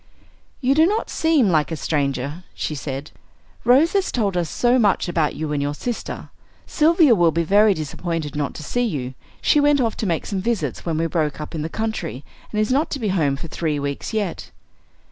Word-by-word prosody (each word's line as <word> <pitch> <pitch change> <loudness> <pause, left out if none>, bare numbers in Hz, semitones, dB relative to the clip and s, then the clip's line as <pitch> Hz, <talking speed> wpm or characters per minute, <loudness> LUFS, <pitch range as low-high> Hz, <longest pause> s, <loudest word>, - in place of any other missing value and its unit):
"You 260 +1 +3
do 315 +3 +5
not 425 +4 -1
seem 315 -9 +3
like 155 -2 +2
a - - -1
stranger," 145 +1 -2
she - - -3
said, 140 0 -5 0.5
"Rose 265 +8 +5
has 395 -1 +1
told 205 -6 0
us 175 -3 0
so 245 +1 +2
much 205 -4 +2
about 165 -3 0
you 155 -1 -3
and 145 - 0
your 145 +1 -2
sister. 240 +8 -5 0.4
Sylvia 320 -3 +4
will 175 -5 +4
be 165 +1 0
very 205 +4 +4
disappointed 155 0 -4
not 145 -2 -2
to - - -7
see 245 +10 -1
you. 140 - -2 0.3
She 295 - +4
went 290 0 +4
off 230 -4 +1
to 215 - -2
make 165 -3 -1
some 195 -2 -2
visits 230 -4 -2
when 160 -2 0
we 165 - +1
broke 155 -3 -1
up 150 - -7
in 160 - -3
the 160 - -3
country, 175 - -4 0.3
and 210 - -1
is 215 +3 +1
not 285 +5 +2
to 280 - -3
be 220 -4 -1
home 155 -7 +1
for 140 - -7
three 155 -2 -2
weeks 140 0 -4
yet." 210 -6 -3
175 Hz, 210 wpm, -22 LUFS, 150-240 Hz, 0.5 s, do